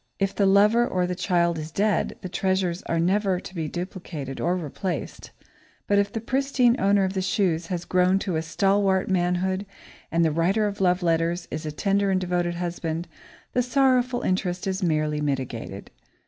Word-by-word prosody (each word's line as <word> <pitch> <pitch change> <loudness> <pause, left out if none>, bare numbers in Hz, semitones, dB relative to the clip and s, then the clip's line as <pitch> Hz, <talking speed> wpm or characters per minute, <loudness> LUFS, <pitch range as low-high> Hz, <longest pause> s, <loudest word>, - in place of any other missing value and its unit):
If 195 0 0
the 200 - +2
lover 210 +5 +5
or 180 -1 0
the 180 - -2
child 175 -2 +1
is 155 0 -6
dead, 205 +4 0
the - - -5
treasures 185 -1 0
are 165 - 0
never 190 +2 +1
to 185 - -10
be 165 -4 -3
duplicated 170 -6 -6
or 175 +2 +1
replaced, 175 +2 -5 0.6
but 200 0 +3
if 200 0 0
the 225 - -3
pristine 260 0 +2
owner 200 0 +4
of 190 0 -1
the 190 - -1
shoes 180 -3 0
has 175 -1 -3
grown 185 +1 +3
to 165 -4 -1
stalwart 195 +3 +1
manhood 185 +1 0 0.5
and 170 0 +3
the 160 - +2
writer 185 +7 +1
of 205 -1 -2
the 195 - -1
love 180 +1 +2
letters 170 +1 0
is 155 0 -4
a - - -3
tender 200 +5 +1
and 190 -1 +2
devoted 175 -1 -1
husband, 170 -1 -3 0.5
the 250 - +3
sorrowful 255 -1 +2
interest 185 -1 -1
is 190 +1 -2
merely 155 -3 0
mitigated. 130 -8 -4
185 Hz, 180 wpm, -25 LUFS, 170-200 Hz, 0.6 s, lover